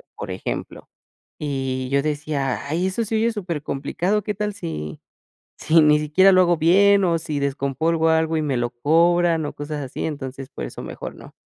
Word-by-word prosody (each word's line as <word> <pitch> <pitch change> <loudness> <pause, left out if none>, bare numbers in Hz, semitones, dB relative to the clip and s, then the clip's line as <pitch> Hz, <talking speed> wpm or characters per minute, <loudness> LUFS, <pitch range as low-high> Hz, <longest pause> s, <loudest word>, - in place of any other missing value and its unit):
por - - -6
ejemplo. - - -5 0.5
Y 135 -4 -2
yo 140 +1 +1
decía: 145 -2 -2
"Ay, 170 +6 0
eso 225 +5 -1
se 220 +1 -2
oye 230 +2 +2
súper 175 -8 -4
complicado, 175 +10 -1
¿qué 210 - -2
tal 210 0 -3
si 75 - -6 0.6
si 165 +1 +4
ni 150 0 +5
siquiera 180 +6 +4
lo 185 0 +6
hago 175 -1 +3
bien, 195 +5 +5
o 170 -2 +2
si 155 -2 -4
descompongo 140 +4 0
algo 160 0 +2
y - - -1
me 140 -4 -1
lo 120 0 0
cobran, 165 +5 +2
o - - -6
cosas 145 0 -5
así?". 130 - -5
Entonces, 135 -3 -5
por - - -6
eso - - -8
mejor - - -7
no. - - -13
155 Hz, 190 wpm, -22 LUFS, 140-175 Hz, 0.6 s, lo